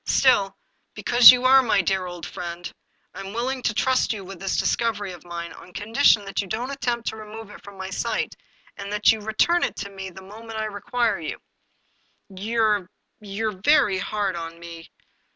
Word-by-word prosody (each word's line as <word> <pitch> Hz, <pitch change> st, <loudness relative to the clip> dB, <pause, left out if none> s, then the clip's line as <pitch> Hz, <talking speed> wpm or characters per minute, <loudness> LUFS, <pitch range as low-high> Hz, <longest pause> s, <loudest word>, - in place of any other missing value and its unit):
Still, 205 Hz, -7 st, +3 dB, 0.4 s
because 240 Hz, -1 st, +8 dB
you 250 Hz, 0 st, +6 dB
are 265 Hz, +1 st, +7 dB
my 210 Hz, -6 st, +2 dB
dear 190 Hz, 0 st, 0 dB
old 175 Hz, -1 st, -7 dB
friend, 175 Hz, 0 st, -7 dB, 0.4 s
I -, -, -9 dB
am 195 Hz, 0 st, -7 dB
willing 255 Hz, +3 st, -2 dB
to 240 Hz, -, +1 dB
trust 260 Hz, +2 st, +2 dB
you 200 Hz, -3 st, -7 dB
with 190 Hz, -1 st, -10 dB
this 195 Hz, +1 st, -2 dB
discovery 215 Hz, -4 st, 0 dB
of 175 Hz, -2 st, -11 dB
mine, 170 Hz, -1 st, -7 dB
on 180 Hz, -, -14 dB
condi 220 Hz, +6 st, -6 dB
tion 210 Hz, -7 st, +6 dB
that 195 Hz, -, -2 dB
you 200 Hz, -, -8 dB
don't 240 Hz, +7 st, -3 dB
attempt 240 Hz, -4 st, -2 dB
to -, -, -7 dB
remove 215 Hz, 0 st, -10 dB
it -, -, -13 dB
from 200 Hz, -1 st, -12 dB
my 190 Hz, 0 st, -6 dB
sight, 230 Hz, +5 st, -2 dB, 0.4 s
and 200 Hz, 0 st, -7 dB
that 210 Hz, 0 st, +4 dB
you 220 Hz, -, -2 dB
return 220 Hz, +12 st, +2 dB
it -, -, -1 dB
to 200 Hz, 0 st, -6 dB
me 195 Hz, -1 st, -7 dB
the 190 Hz, +1 st, -12 dB
moment 220 Hz, +3 st, -9 dB
I 220 Hz, -, -1 dB
require 215 Hz, -1 st, -1 dB
you/' 155 Hz, -, -5 dB, 0.5 s
" 195 Hz, -, -24 dB
You're 210 Hz, -2 st, 0 dB, 0.2 s
— -, -, -51 dB
you're 210 Hz, -1 st, -4 dB
very 210 Hz, -10 st, +4 dB
hard 200 Hz, -1 st, -2 dB
on 165 Hz, 0 st, -6 dB
me." 170 Hz, -1 st, -10 dB
205 Hz, 205 wpm, -24 LUFS, 190-230 Hz, 0.5 s, because